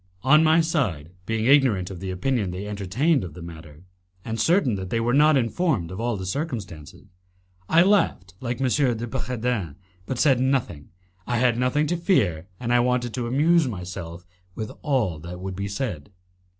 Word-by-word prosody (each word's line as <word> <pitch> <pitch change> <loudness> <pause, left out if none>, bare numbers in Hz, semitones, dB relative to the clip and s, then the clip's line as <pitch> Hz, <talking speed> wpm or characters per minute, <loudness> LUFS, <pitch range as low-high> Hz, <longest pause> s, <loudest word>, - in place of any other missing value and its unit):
On 150 +4 +6
my 160 +1 +5
side, 105 - -1 0.2
being 110 0 -1
ignorant 125 -9 +3
of 90 - -8
the 95 +1 -5
opinion 100 +3 -1
they 90 +3 -5
entertained 105 - 0
of 85 -5 -8
the 90 - -9
matter, 80 -2 -11 0.4
and 115 0 -4
certain 160 - +3
that 95 -2 -4
they 115 - 0
were 120 +1 0
not 150 +1 +5
informed 120 - 0
of 95 - -6
all 120 -1 -1
the 95 - -5
circumstances, 100 - -5 0.6
I 165 +2 +6
laughed 180 - +1
like 120 0 -4
M. 135 - +1
de 120 -3 +1
Bragadin, 115 - -3 0.3
but 130 - -3
said 135 -1 +3
nothing. 125 - -1 0.4
I 120 - 0
had 125 0 +3
nothing 130 +4 +1
to 175 +3 -1
fear, 100 - +1
and 120 -1 -1
I 120 - +5
wanted 120 -1 0
to 120 -2 -3
amuse 155 +5 +3
myself 90 -4 -7 0.3
with 110 -1 -5
all 120 - 0
that 85 +3 -8
would 95 0 -5
be 100 +1 -3
said. 100 - -4
115 Hz, 180 wpm, -24 LUFS, 95-135 Hz, 0.6 s, On